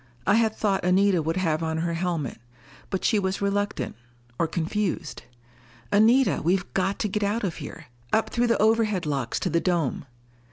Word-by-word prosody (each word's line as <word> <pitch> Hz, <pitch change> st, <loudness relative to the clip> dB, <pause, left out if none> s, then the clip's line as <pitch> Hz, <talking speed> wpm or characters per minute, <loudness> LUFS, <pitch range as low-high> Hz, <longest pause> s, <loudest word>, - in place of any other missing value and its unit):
I -, -, +4 dB
had 220 Hz, 0 st, +3 dB
thought 195 Hz, -3 st, 0 dB
Anita 185 Hz, 0 st, +3 dB
would 165 Hz, +3 st, -2 dB
have 165 Hz, -4 st, 0 dB
on 160 Hz, -1 st, -1 dB
her 170 Hz, +1 st, -1 dB
helmet. 165 Hz, -8 st, -2 dB, 0.5 s
But 190 Hz, -, -2 dB
she 215 Hz, -, +3 dB
was 190 Hz, 0 st, -1 dB
reluctant, 205 Hz, +1 st, -1 dB, 0.4 s
or 165 Hz, -, +2 dB
confused. 175 Hz, +4 st, -2 dB, 0.7 s
"Anita, 230 Hz, +6 st, +4 dB
we've 180 Hz, +3 st, +2 dB
got 195 Hz, +1 st, 0 dB
to 215 Hz, -, +1 dB
get 210 Hz, +1 st, -2 dB
out 210 Hz, +3 st, 0 dB
of 180 Hz, -5 st, -2 dB
here! 145 Hz, -, -8 dB, 0.3 s
Up 220 Hz, -, +1 dB
through 240 Hz, 0 st, +1 dB
the 230 Hz, -, +2 dB
overhead 215 Hz, -4 st, +2 dB
locks 135 Hz, -5 st, -1 dB
to -, -, 0 dB
the 170 Hz, -, +2 dB
dome." 165 Hz, -7 st, -1 dB
190 Hz, 175 wpm, -25 LUFS, 165-210 Hz, 0.7 s, I